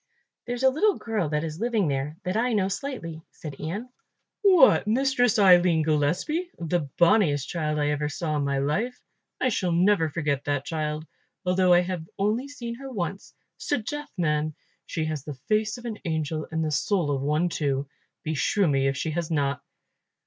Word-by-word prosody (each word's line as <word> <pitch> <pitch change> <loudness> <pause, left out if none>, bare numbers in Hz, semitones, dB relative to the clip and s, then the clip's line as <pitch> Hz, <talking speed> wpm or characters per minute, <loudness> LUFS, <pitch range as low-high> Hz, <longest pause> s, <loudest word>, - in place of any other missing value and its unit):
"There's 245 +1 -3
a 265 - +6
little 400 +9 +2
girl 215 -9 -2
that 150 0 0
is 160 0 -5
living 225 -5 +1
there, 140 +2 -2
that 185 +1 -2
I 240 +2 +1
know 195 -3 +1
slightly," 190 - -5
said 145 -4 -9
Ian. 200 +11 -4 0.5
"What, 365 - +6
Mistress 245 0 +2
Aline 180 -5 +6
Gillespie! 160 - 0
the 165 -3 -1
bonniest 170 -7 +4
child 155 -3 -2
I 145 0 +1
ever 150 0 -1
saw 155 0 -2
in 145 - 0
my 140 -1 0
life. 200 - -1 0.4
I 255 - +2
shall 185 -6 0
never 175 -1 +3
forget 145 -3 -1
that 145 -1 -1
child, 155 -1 -3 0.4
although 180 0 +3
I 175 0 +7
have 180 -3 -4
only 215 +7 0
seen 240 -5 -6
her 270 0 -7
once. 195 -3 -5 0.2
'Sdeath, 295 +2 -2
man, 155 -2 0 0.3
she 160 - -2
has 155 -3 -3
the 145 -1 -6
face 215 - 0
of 240 - -11
an 225 -3 -5
angel 160 -2 -2
and 160 0 -1
the 155 - -1
soul 170 0 +1
of 135 -2 -1
one 150 +5 +1
too, 140 -4 -1 0.4
beshrew 160 +5 +1
me 135 -2 +2
if 135 0 0
she 160 - -2
has 170 0 -2
not." 140 -4 0
170 Hz, 180 wpm, -26 LUFS, 150-215 Hz, 0.5 s, I